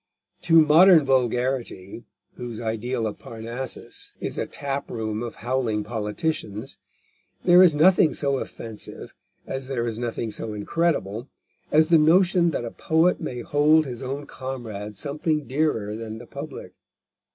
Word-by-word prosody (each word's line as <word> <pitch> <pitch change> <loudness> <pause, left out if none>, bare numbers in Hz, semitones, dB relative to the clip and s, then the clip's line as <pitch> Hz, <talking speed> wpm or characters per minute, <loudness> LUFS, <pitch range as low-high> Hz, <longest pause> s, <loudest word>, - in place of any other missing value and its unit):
To 165 -1 +5
modern 160 +1 +7
vulgarity, 125 -5 -1 0.3
whose 120 -3 -7
ideal 115 +1 -2
of 110 - -4
Parnassus 115 +3 -7
is - - -4
a - - -2
tap 140 0 -4
room 110 -2 -3
of 120 -1 -5
howling 120 -4 0
politicians, 110 - -3 0.7
there 180 0 +7
is 175 -5 +6
nothing 160 -1 +5
so 140 -2 0
offensive, 110 -2 -8 0.3
as 135 -1 -5
there 125 -3 -2
is 115 -1 -4
nothing 115 -2 -3
so 110 0 -4
incredible, 120 - -1 0.4
as 155 +1 +4
the 165 -2 +6
notion 175 +2 +4
that 130 -6 -3
a 115 - -5
poet 165 +3 +1
may 125 -1 -4
hold 150 +4 +3
his 125 -2 -6
own 135 +2 -4
comrade 110 -7 -7
something 150 - -1
dearer 130 -7 -1
than 110 0 -6
the 120 - -10
public. - - -8
130 Hz, 140 wpm, -24 LUFS, 115-155 Hz, 0.7 s, modern